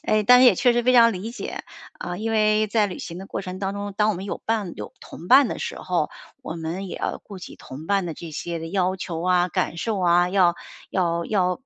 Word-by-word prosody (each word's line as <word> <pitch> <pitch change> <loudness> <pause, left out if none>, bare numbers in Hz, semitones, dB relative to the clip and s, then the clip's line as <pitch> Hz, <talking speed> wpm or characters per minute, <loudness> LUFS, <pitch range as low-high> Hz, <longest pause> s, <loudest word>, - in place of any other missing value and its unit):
哎， 215 0 +2
但 250 +4 +7
是 - - +7
也 235 - +7
确 245 +4 +3
实 240 0 +1
非 255 +1 +3
常 230 -2 +6
理 200 +5 -5
解。 245 - -6 0.3
啊， 175 0 -5
因 225 +1 -2
为 215 0 +3
在 210 0 +2
旅 185 - -7
行 170 - -7
的 195 - -8
过 - - -4
程 185 -1 -7
当 195 0 -2
中， 205 0 -5
当 210 0 +3
我 210 - -1
们 190 +3 -6
有 - - -4
伴 215 -6 -1
有 - - -7
同 175 - -11
伴 265 0 +7
的 - - -4
时 - - -5
候， - - -1 0.3
我 160 - -5
们 170 +4 -4
也 - - -6
要 - - -3
顾 200 -3 -10
及 185 - -10
同 145 +5 -10
伴 200 -2 +1
的 170 - -4
这 165 +1 -9
些 170 +2 -4
的 165 - -6
要 185 0 0
求 170 -3 -5
啊， 180 0 +2
感 165 0 -2
受 220 0 -2
啊， 175 0 +3
要 180 -2 +3 0.4
要 170 -2 0
要 185 -1 0
190 Hz, 275 characters per minute, -23 LUFS, 175-215 Hz, 0.4 s, 但